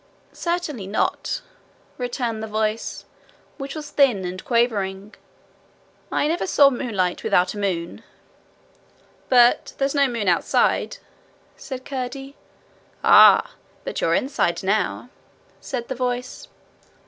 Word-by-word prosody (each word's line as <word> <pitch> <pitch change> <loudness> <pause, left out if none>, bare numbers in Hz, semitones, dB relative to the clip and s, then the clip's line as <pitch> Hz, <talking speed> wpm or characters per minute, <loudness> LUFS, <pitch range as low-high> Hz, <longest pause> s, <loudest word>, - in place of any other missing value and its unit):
'Certainly 335 - -3
not,' 215 - -1 0.6
returned 240 -3 -3
the 220 - -4
voice, 215 +1 -2 0.5
which 275 +1 -6
was 300 -1 -7
thin 245 -10 +3
and 180 +1 -6
quavering: 210 -4 0 1.0
'I - - +1
never 335 +4 -1
saw 285 -5 +5
moonlight 210 -9 -2
without 180 0 +2
a 210 - -7
moon.' 175 -4 -3 1.3
'But 245 -1 +4
there's 275 0 0
no 280 -1 +3
moon 230 -5 -3
outside,' 180 - +1 0.6
said 260 -2 -8
Curdie. 270 +1 -5 0.7
'Ah! - - +7 0.3
but - - -4
you're - - +2
inside 260 -11 0
now,' 205 +4 -1 0.5
said 240 -3 -5
the - - -3
voice. 250 0 -4
245 Hz, 110 wpm, -22 LUFS, 205-275 Hz, 1.3 s, Ah